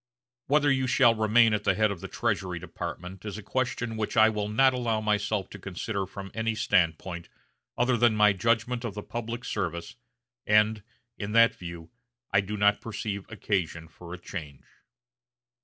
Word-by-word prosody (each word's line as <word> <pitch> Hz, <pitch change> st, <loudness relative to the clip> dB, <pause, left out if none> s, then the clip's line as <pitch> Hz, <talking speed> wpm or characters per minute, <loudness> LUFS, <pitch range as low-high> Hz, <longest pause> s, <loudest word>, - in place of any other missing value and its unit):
Whether 145 Hz, 0 st, +3 dB
you 130 Hz, -1 st, +1 dB
shall 125 Hz, -2 st, +5 dB
remain 110 Hz, +1 st, +4 dB
at 105 Hz, -1 st, 0 dB
the -, -, +2 dB
head 110 Hz, -1 st, +2 dB
of 95 Hz, -4 st, -6 dB
the -, -, -5 dB
Treasury 90 Hz, -2 st, -2 dB
Department 90 Hz, +2 st, -7 dB
is 105 Hz, -2 st, -5 dB
a 105 Hz, -, -8 dB
question 120 Hz, -1 st, -2 dB
which 110 Hz, +2 st, -3 dB
I 110 Hz, 0 st, +7 dB
will 105 Hz, -1 st, -2 dB
not 130 Hz, +5 st, +4 dB
allow 120 Hz, -3 st, 0 dB
myself 105 Hz, -1 st, 0 dB
to 105 Hz, -, -9 dB
consider 95 Hz, +1 st, -4 dB
from 95 Hz, 0 st, -8 dB
any 115 Hz, 0 st, -1 dB
standpoint 85 Hz, -5 st, 0 dB, 0.5 s
other 125 Hz, +1 st, +3 dB
than 120 Hz, -2 st, +3 dB
my 105 Hz, -1 st, +5 dB
judgment 115 Hz, +5 st, 0 dB
of 115 Hz, -4 st, -4 dB
the 105 Hz, -, -5 dB
public 120 Hz, +1 st, -5 dB
service, 85 Hz, -3 st, -4 dB, 0.5 s
and, 105 Hz, 0 st, +4 dB, 0.4 s
in 105 Hz, 0 st, -4 dB
that 115 Hz, 0 st, +6 dB
view, 85 Hz, -2 st, -9 dB, 0.4 s
I 95 Hz, -, +5 dB
do 105 Hz, +2 st, -5 dB
not 105 Hz, 0 st, +3 dB
perceive 105 Hz, -3 st, -5 dB
occasion 90 Hz, -7 st, -2 dB
for 85 Hz, +2 st, -12 dB
a 90 Hz, -, -5 dB
change." 75 Hz, -6 st, -8 dB
105 Hz, 175 wpm, -28 LUFS, 95-115 Hz, 0.5 s, I